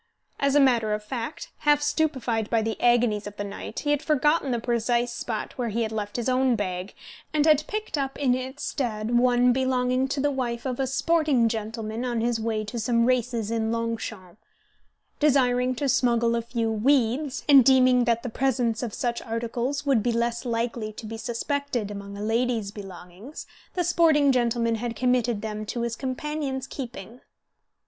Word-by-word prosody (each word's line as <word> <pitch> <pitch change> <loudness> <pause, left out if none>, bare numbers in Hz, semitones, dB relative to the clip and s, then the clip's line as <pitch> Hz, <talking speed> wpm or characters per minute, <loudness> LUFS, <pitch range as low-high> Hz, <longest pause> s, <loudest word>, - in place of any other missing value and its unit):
As 280 0 +2
a - - +6
matter 235 -6 +3
of 210 - -7
fact, 260 - -5
half 295 0 +4
stupefied 260 -8 0
by 225 -2 +2
the 220 -1 -3
agonies 240 -4 +2
of 205 - -9
the 205 - -3
night, 200 +2 -6
he 290 - 0
had 290 -1 +1
forgotten 300 -1 +2
the 240 - 0
precise 240 +1 0
spot 225 -2 -4
where 240 -2 -1
he 230 +2 -1
had 220 - -3
left 210 -2 -4
his 240 0 -2
own 255 -1 +3
bag, 185 -2 -4 0.4
and 300 -1 +3
had 305 -1 +4
picked 425 -7 -3
up 270 -1 -3
in 265 -3 +2
its 260 +3 -4
stead 230 -4 -2
one 245 0 +4
belonging 255 0 +1
to 270 +1 -2
the 290 +1 +1
wife 245 -3 -3
of 255 -1 -3
a 265 - 0
sporting 275 -2 +2
gentleman 225 +1 -4
on 240 -2 -1
his 235 0 0
way 220 -1 -1
to 215 +3 -5
some 230 +1 +2
races 240 -3 0
at 230 -1 0
Longchamps. 225 -4 -3 0.8
Desiring 255 -3 +3
to 280 +3 -1
smuggle 235 -2 +2
a 235 - 0
few 230 -1 -2
"weeds," 255 +4 +1
and 280 -3 +8
deeming 255 -1 +5
that 235 -1 +1
the - - -3
presence 240 -2 0
of 235 -4 -4
such 235 -1 -2
articles 240 +5 -3
would 270 -6 +3
be 240 +3 0
less 235 +1 -1
likely 230 -2 -2
to 220 - -9
be 225 +1 -6
suspected 240 -1 -2
among 200 0 -7
a 205 - -5
lady's 225 -2 0
belongings, 195 - -10 0.3
the 360 - +1
sporting 320 -5 +4
gentleman 235 -2 +1
had 240 -1 -3
committed 245 -2 +1
them 215 -1 -4
to 235 +3 -4
his 235 -1 -2
companion's 270 0 -3
keeping. 240 -4 -8
240 Hz, 185 wpm, -25 LUFS, 225-265 Hz, 0.8 s, and